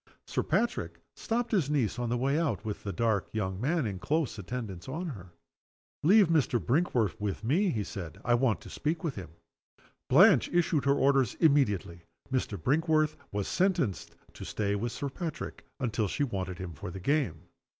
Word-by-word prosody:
Sir - - -1
Patrick 235 0 -1 0.2
stopped 235 +1 -2
his 180 - +2
niece 130 -6 0
on 120 -1 -1
her 120 - +1
way 135 +5 +1
out, 160 -8 -1
with 105 -2 -4
the 100 - -3
dark 110 -3 0
young 95 -3 -2
man 155 +2 +1
in 100 -4 -3
close 150 - -1
attendance 100 -1 -6
on 165 +6 -3
her. 95 - -9 0.7
"Leave 200 +4 +6
Mr. 150 -7 +2
Brinkworth 120 - +1
with 105 +1 -3
me," 170 - +2
he 110 -9 -1
said. 85 -6 -7
"I 120 - +3
want 120 -2 +2
to - - -11
speak 160 +2 -2
to 165 - +1
him." 95 - -7 0.8
Blanche 170 - +6
issued 170 -4 +2
her 140 0 +4
orders 135 -4 +3
immediately. 105 - +2 0.3
Mr. 125 -5 -1
Brinkworth 155 +2 +2 0.2
was 100 -1 -2
sentenced 175 - 0 0.2
to - - -9
stay 100 -1 -1
with 115 +4 -2
Sir 140 - -4
Patrick 160 +2 -6
until 115 -4 0
she 145 - -1
wanted 95 -8 -3
him 90 -2 -6
for 75 - -7
the 95 +2 -7
game. 115 - 0
125 Hz, 180 wpm, -30 LUFS, 100-155 Hz, 0.8 s, Leave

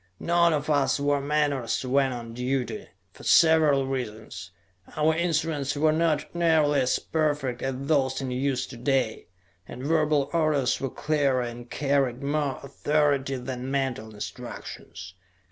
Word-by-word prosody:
None 170 0 +3
of 150 -2 -1
us 145 -2 +2
wore 145 0 +1
menores 140 -4 0
when 135 +1 +2
on 115 -2 -6
duty, 125 +1 -2 0.3
for - - -15
several 155 -4 +5
reasons. 110 -7 -5 0.5
Our 155 +1 +3
instruments 160 -4 0
were 155 +2 +3
not 155 -1 0
nearly 160 -4 +3
as 130 - +2
perfect 145 -6 -1
as 135 -1 -2
those 140 -2 +1
in 135 -2 -4
use 130 0 -1
to 125 - -11
day, 130 -2 0 0.4
and 125 - -8
verbal 150 -2 +2
orders 155 -6 +1
were 135 - -1
clearer 140 -3 0
and 120 0 -7
carried 135 -3 0
more 145 -1 -1
authority 140 -1 0
than 125 0 -5
mental 130 -5 -2
instructions. 95 -2 -8
140 Hz, 140 wpm, -26 LUFS, 130-150 Hz, 0.5 s, several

